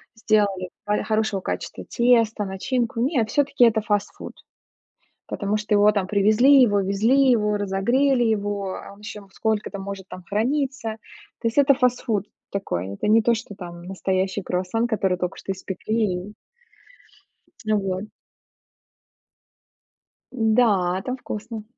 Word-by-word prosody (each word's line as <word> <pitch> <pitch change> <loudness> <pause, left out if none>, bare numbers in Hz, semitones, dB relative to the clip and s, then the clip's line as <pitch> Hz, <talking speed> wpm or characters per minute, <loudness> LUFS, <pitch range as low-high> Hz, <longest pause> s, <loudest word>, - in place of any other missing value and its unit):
сделали 205 -4 +1 0.2
хо 210 0 0
хорошего 215 -3 0
качества - - -5
тесто, 230 -3 +2
начинку. 230 +5 -2
Нет, 250 -4 +1
всё-таки- 280 -2 +3
это 220 -1 +3
фастфуд. 205 -1 -3 1.0
Потому 205 0 -1
что 210 0 -1
его 205 +1 +5
там 200 -3 -1
привезли, 215 +8 +5
его 205 -4 +3
везли, 225 +8 +3
его 210 -3 +2
разогрели 240 +7 +1
его 205 -3 -1
а - - -10
он 200 - -19
ещё 210 -1 -9
сколько-то 215 -1 -2
может 195 -1 -7
там 185 - -9
храниться. 255 +1 -1 0.4
То 230 - +1
есть- 230 - -3
это 280 -1 +6
фастфуд 245 -5 0 0.3
такой. 95 - -3
Это 100 - -3
не 225 +1 +5
то, 235 +1 +3
что 220 -2 -7
там 175 -3 -9
настоящий 190 +1 -2
круассан, 185 +6 -1
который 190 -5 0
только 180 0 -3
что 195 - -4
испекли 190 0 -2
и - - -11 1.4
Вот. 195 -2 -1 2.3
Да, 215 -6 +2
там 255 +1 -3
вкусно. 220 -2 -6
210 Hz, 130 wpm, -23 LUFS, 195-230 Hz, 2.3 s, это